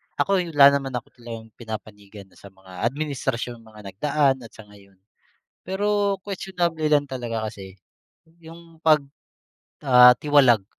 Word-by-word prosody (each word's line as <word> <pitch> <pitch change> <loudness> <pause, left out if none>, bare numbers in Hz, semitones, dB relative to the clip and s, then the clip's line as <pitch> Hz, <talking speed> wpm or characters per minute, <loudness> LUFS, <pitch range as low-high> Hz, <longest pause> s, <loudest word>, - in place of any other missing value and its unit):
ako'y 180 -5 -1
wala 140 0 +8
naman 135 -2 -6
ako 120 - -6
talagang 115 -1 -10
pinapanigan 105 -2 -9
na - - -21
sa - - -13
mga 95 -1 -14
administrasyong 130 -4 -4
mga 110 -1 -16
nagdaan 140 +5 +1
at 115 -2 -14
sa 110 - -12
ngayon, 100 -1 -19 0.7
pero 200 +1 -1
questionable 180 -4 -3
lang 145 -1 +3
talaga 115 -4 -4
kasi 100 -3 -11 0.6
yung 165 0 -15
pag, 155 -1 +5 0.9
ah, 125 -1 +8
tiwalag 130 -9 +3
130 Hz, 135 wpm, -23 LUFS, 110-160 Hz, 0.9 s, wala